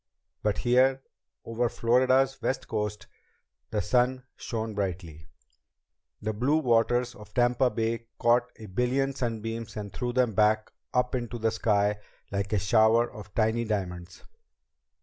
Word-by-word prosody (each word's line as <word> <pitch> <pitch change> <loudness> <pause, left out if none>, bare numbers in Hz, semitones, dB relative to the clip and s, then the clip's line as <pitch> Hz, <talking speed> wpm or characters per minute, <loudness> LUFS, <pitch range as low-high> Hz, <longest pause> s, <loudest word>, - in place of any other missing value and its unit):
But 105 -1 0
here, 130 +2 +3 0.4
over 115 +1 0
Florida's 130 +3 +2
west 135 - -2
coast, 105 0 -3 0.6
the 105 -2 -1
sun 125 +1 +1
shone 110 -1 -4
brightly. 90 -5 -4 1.0
The 110 0 -1
blue 130 +8 +2
waters 120 -2 +2
of 105 0 -14
Tampa 125 +1 +3
Bay 115 0 -2
caught 120 0 +3
a 110 - -11
billion 125 +7 0
sunbeams 115 -3 -4
and 100 -2 -6
threw 120 +2 -2
them 125 -2 +1
back 110 +1 +2 0.2
up 125 0 +1
into 120 -1 -3
the 115 0 0
sky 105 -2 +1 0.3
like 100 0 -2
a 105 - +2
shower 110 +4 +3
of 105 -1 -12
tiny 110 +1 +2
diamonds. 90 -5 -4
115 Hz, 135 wpm, -28 LUFS, 105-125 Hz, 1.0 s, here